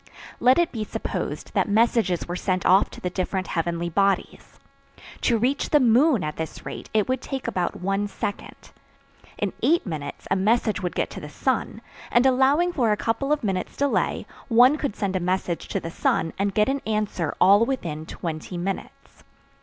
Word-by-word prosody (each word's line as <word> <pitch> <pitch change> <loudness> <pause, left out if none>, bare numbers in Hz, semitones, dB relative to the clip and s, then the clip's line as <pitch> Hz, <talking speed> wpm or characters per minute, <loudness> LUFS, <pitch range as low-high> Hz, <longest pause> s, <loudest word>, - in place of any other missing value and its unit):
Let 255 +1 +5
it 345 -1 +2
be 220 -3 -3
supposed - - -4
that - - +1
messages 220 -4 +2
were 175 - -3
sent 185 -1 -1
off 190 +2 +5
to - - -11
the 180 - -3
different 185 +1 -2
heavenly 170 0 -1
bodies. 195 +3 -1 0.7
To 235 - +3
reach 255 +6 0
the 295 - +5
moon 255 - +4
at 150 0 -4
this 160 0 -6
rate - - -7
it 215 -2 +2
would 260 0 -1
take 270 -2 -5
about 180 -2 -2
one 195 +2 0
second. 205 0 -6 0.7
In - - -2
eight 335 +3 +3
minutes 150 -6 -6
a - - +4
message 215 +2 +1
would 180 -2 -3
get - - -1
to - - -7
the - - -8
sun, - - -2 0.3
and 240 +2 +3
allowing 270 +7 +3
for 240 -8 +2
a 210 - +2
couple 230 +7 -1
of 300 -3 +1
minutes' 190 -3 -2
delay, 285 0 0 0.2
one 250 +4 +6
could 285 -8 -3
send 195 -2 -2
a - - +1
message 180 -1 -2
to - - -2
the 165 - -6
sun 165 -1 0
and 200 -1 0
get 210 0 +3
an 275 0 -1
answer 210 -7 -1
all 200 +4 +6
within 165 - -3
twenty 165 +1 -5
minutes. 190 +3 -6
205 Hz, 185 wpm, -24 LUFS, 180-250 Hz, 0.7 s, one